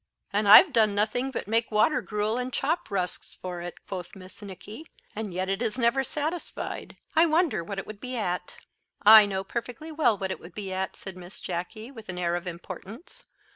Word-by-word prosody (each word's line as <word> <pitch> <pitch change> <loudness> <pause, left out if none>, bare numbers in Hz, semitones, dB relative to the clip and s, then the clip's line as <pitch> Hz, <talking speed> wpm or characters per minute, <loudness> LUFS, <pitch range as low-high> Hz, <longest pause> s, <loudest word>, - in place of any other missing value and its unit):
"And 205 +1 +1
I've 280 - +9
done 215 -3 +3
nothing 220 +6 0
but 265 - -5
make 225 +2 +1
water 215 +8 +3
gruel 210 +2 -1
and 250 +1 -3
chop 310 +7 -1
rusks 185 -3 -3
for 180 -1 -6
it," 175 -1 -6
quoth 180 -3 -6
Miss 185 +2 -13
Nicky, 210 - -10 0.3
"and 215 -2 -4
yet 185 +2 -2
it 195 +3 -1
is 225 -1 -1
never 255 +2 +2
satisfied; 310 +5 -4 0.2
I 325 +2 +6
wonder 320 - +2
what 195 +4 -6
it 195 - -4
would 215 -1 -9
be 255 +2 -4
at." 180 -5 -2 0.5
"I 215 0 +10
know 190 -1 -2
perfectly 245 +9 -6
well 300 -9 +2
what 190 -1 -3
it - - -4
would 170 +1 -13
be 195 -3 -5
at," 190 0 -3
said 190 -2 -9
Miss 180 +1 -11
Jacky, 205 +7 -5
with 225 -6 -12
an 180 - -5
air 175 -1 0
of 175 +1 -4
importance. 190 - -9
210 Hz, 205 wpm, -27 LUFS, 190-245 Hz, 0.5 s, I